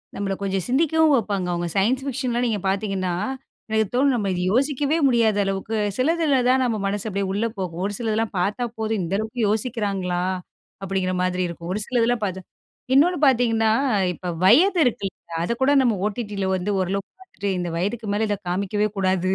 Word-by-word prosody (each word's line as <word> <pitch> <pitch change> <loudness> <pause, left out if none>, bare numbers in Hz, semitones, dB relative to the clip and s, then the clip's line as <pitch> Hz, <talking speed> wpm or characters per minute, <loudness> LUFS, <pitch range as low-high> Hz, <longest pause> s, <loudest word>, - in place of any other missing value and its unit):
நம்மள 195 -1 -2
கொஞ்சம் 195 -2 -1
சிந்திக்கவும் 310 +2 +3
வப்பாங்க. 200 -4 -1
அவங்க 175 0 -2
சயன்ஸ் 245 +7 +2
ஃபிக்ஷன்லாம் 250 -2 -1
நீங்க 215 -3 -1
பார்த்தீங்கன்னா, 195 -2 -1 0.6
எனக்கு 220 -1 +1
தோணும் 270 +1 +3
நம்ம 205 -4 -1
இத 180 - -2
யோசிக்கவே 285 +4 +1
முடியாத 230 -4 +3
அளவுக்கு 195 +3 -2 0.2
சிலதுல 305 0 +2
தான் 260 0 +4
நம்ம 225 -3 0
மனசு 205 +2 -2
அப்படியே 200 0 -2
உள்ள 215 +3 0
போகும். 180 -2 -4
ஒரு 205 - -2
சிலதெல்லாம் 225 -1 -1
பார்த்தா 210 +7 0
போதும் 220 -1 -1
இந்த 180 +4 -2
அளவுக்கு 220 +3 -3
யோசிக்கிறாங்களா? 200 -6 -1 0.6
அப்படிங்கிற 190 -1 -1
மாதிரி 185 0 0
இருக்கும். 170 +1 -7
ஒரு 210 - -1
சிலதெல்லாம் 240 -2 +1
பார்த்தா 190 -1 -4 0.5
இன்னொன்னு 345 +6 +4
பார்த்தீங்கன்னா, 225 -3 +3 0.4
இப்போ 180 +2 -8 0.2
வயது 340 - +5
இருக்குல்ல 200 -5 -1 0.3
அதைக்கூட 265 +8 +1
நம்ம 240 -4 +3
ஓடிடியில 205 -2 -3
வந்து 185 +3 -2
ஓரளவுக்கு 195 +2 -2
பார்த்துட்டு 205 - -5
இந்த 175 -1 -2
வயதுக்கு 210 +5 -2
மேல 215 +1 0
இத 205 - 0
காமிக்கவே 200 +3 0
கூடாது 185 -1 +1
210 Hz, 165 wpm, -23 LUFS, 195-245 Hz, 0.6 s, வயது